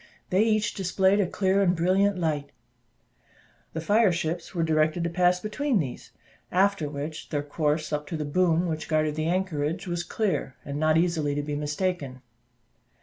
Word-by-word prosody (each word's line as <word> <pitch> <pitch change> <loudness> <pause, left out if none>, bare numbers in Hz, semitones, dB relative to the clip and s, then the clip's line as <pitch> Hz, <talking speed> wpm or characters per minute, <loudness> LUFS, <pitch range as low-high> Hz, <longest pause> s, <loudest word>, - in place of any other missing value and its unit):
They 185 +2 +4
each 215 -1 +2
displayed 190 +1 +2
a 195 - +2
clear 190 +2 +1
and 185 -2 +3
brilliant 190 +4 +2
light; 150 -4 -1 1.2
the 160 - -3
fire 205 +4 +4
ships 165 +2 -3
were 165 - +1
directed 155 +1 +1
to 170 - -1
pass 180 +1 +3
between 225 +6 -1
these; 140 -9 -4 0.4
after 190 -4 +2
which, 150 +2 -6
their 145 -2 -1
course 150 +1 -1
up 150 0 -2
to 165 - -3
the 150 - -3
boom 170 +2 +2
which 160 -2 -3
guarded 155 -1 +1
the 155 +1 -2
anchorage, 170 -2 -1
was 175 -2 -2
clear, 185 - -2
and 140 +1 -4
not 155 0 +3
easily 165 -4 +1
to 145 - -1
be 145 0 -3
mistaken. 150 -3 -3
165 Hz, 170 wpm, -26 LUFS, 150-185 Hz, 1.2 s, They